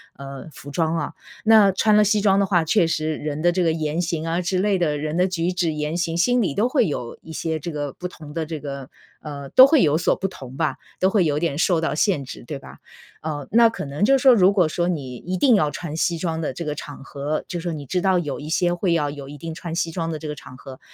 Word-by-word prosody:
呃， 140 +1 -9
服 145 - -10
装 160 +2 0
啊。 165 - -3 0.3
那 220 -2 +6
穿 210 +2 +3
了 - - +6
西 210 0 +2
装 195 -1 +4
的 200 - +3
话， 175 -4 +2
确 170 +1 +3
实 155 -1 -1
人 150 0 -4
的 175 +1 +4
这 180 +1 0
个 165 -2 +2
言 155 +1 -1
行 165 -2 -2
啊 165 +1 0
之 180 +1 -1
类 200 0 +2
的 150 -4 +1
人 155 +2 -3
的 180 +1 +3
举 180 -1 -1
止 175 -3 0
言 150 +2 -2
行， 165 -1 -1
心 245 +8 +3
里 190 - 0
都 230 +4 +2
会 255 - +2
有 125 -5 -4
一 160 - -10
些 160 0 -2
这 165 +1 -6
个 145 -1 -3
不 180 - -6
同 155 -4 -12
的 165 -1 -2
这 155 -2 -6
个 140 -2 -6 0.3
呃， 140 -2 -7
都 260 - +8
会 290 -2 +4
有 150 0 +3
所 165 - +2
不 195 +1 -3
同 130 -7 -10
吧， 150 -2 -1 0.2
都 190 - +4
会 195 -4 +2
有 150 -2 +1
点 155 -3 -1
受 175 -1 +2
到 165 - -1
限 155 -2 +1
制， 125 - -10
对 145 - -4
吧？ - - -13 0.4
呃， 150 -3 -4
那 235 +1 +6
可 225 -6 -4
能 145 +7 -1
就 270 +4 +5
是 260 - -4
说 260 -2 +7
如 195 -2 +5
果 180 -5 +3
说 175 +2 -1
你 140 -8 -3
一 180 +8 -4
定 245 +5 +4
要 155 -7 +2
穿 160 0 -6
西 170 0 +1
装 160 -1 -2
的 155 -4 -2
这 170 - -5
个 150 -2 -2
场 145 -1 -9
合， 145 +2 -3
就 175 - -3
说 170 -1 -3
你 145 -2 -6
知 180 +7 -1
道 190 0 +2
有 155 -5 -3
一 150 - -8
些 175 +2 +1
会 175 0 0
要 150 -3 +1
有 140 -1 -8
一 145 +1 -9
定 165 +2 -6
穿 165 0 -6
西 165 -1 -1
装 165 -1 -3
的 160 - -3
这 155 - -6
个 150 - -4
场 130 - -12
合， 130 0 -11
165 Hz, 300 characters per minute, -22 LUFS, 150-180 Hz, 0.4 s, 都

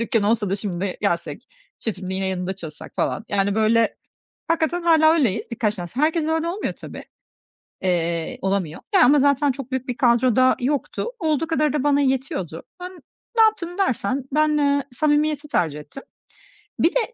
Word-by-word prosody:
dükkân 230 -1 +1
olsa 210 -1 +1
da 195 - 0
şimdi 195 -2 -3
gelsek, 170 0 -2 0.3
şefim, 190 -4 -5
yine 190 0 -1
yanında 185 0 -3
çalışsak" 165 -4 -10
falan. 220 - -1
Yani, 200 0 +1
böyle, 220 +1 +2 0.5
hakikaten 330 +1 0
hâlâ 320 -2 +5
öyleyiz 255 - 0
birkaç 215 -2 -1
tanesi. 180 +7 -6
Herkesle 315 +1 +1
öyle 320 +1 0
olmuyor 370 +5 -3
tabii, - - -10 0.8
eee, 170 -3 -1
olamıyor, 190 -5 -2
ya, 370 - +7
ama 285 +4 +5
zaten 285 +1 +3
çok 265 0 -8
büyük 260 0 -3
bir 250 - -3
kadro 240 -1 +3
da 255 0 +4
yoktu. 275 +3 -2
Olduğu 320 -2 0
kadarı 305 -3 +1
da 295 -3 0
bana 290 -1 +3
yetiyordu. 255 - -2 0.2
Ben 360 +1 -6 0.5
ne 450 - +7
yaptım 375 -5 0
dersen 265 - 0
ben, 305 0 +3
eee, 285 -1 +2
samimiyeti 300 +2 +1
tercih 165 - 0
ettim. 270 - -11 0.8
Bir 330 - +4
de, - - +4
255 Hz, 170 wpm, -22 LUFS, 195-305 Hz, 0.8 s, ya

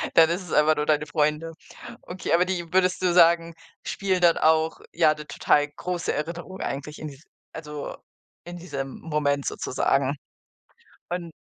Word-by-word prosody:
dann 165 -1 +7
ist 175 +3 -1
es 180 - -10
einfach 155 +1 +4
nur 150 0 -1
deine 150 -1 +2
Freunde. 150 +2 0 0.5
Okay, 180 -1 -4
aber 175 +2 +5
die, 175 -2 -4
würdest 185 -1 +2
du 180 -1 +2
sagen, 170 -1 +5 0.3
spielen 190 -2 -1
dann 170 -1 +5
auch 160 0 +2
ja 160 -2 +4
'ne 150 0 -10
total 145 0 +2
große 175 +4 -3
Erinnerung 175 +4 -5
eigentlich 145 +2 -5
in 155 - -5
dies 145 +1 -12 0.3
also 150 -2 -6 0.5
in 175 0 -8
diesem 140 -6 -6
Moment 145 -3 -1
sozusagen. 135 +1 0 0.9
Und 175 -2 -4
160 Hz, 155 wpm, -25 LUFS, 150-175 Hz, 0.9 s, dann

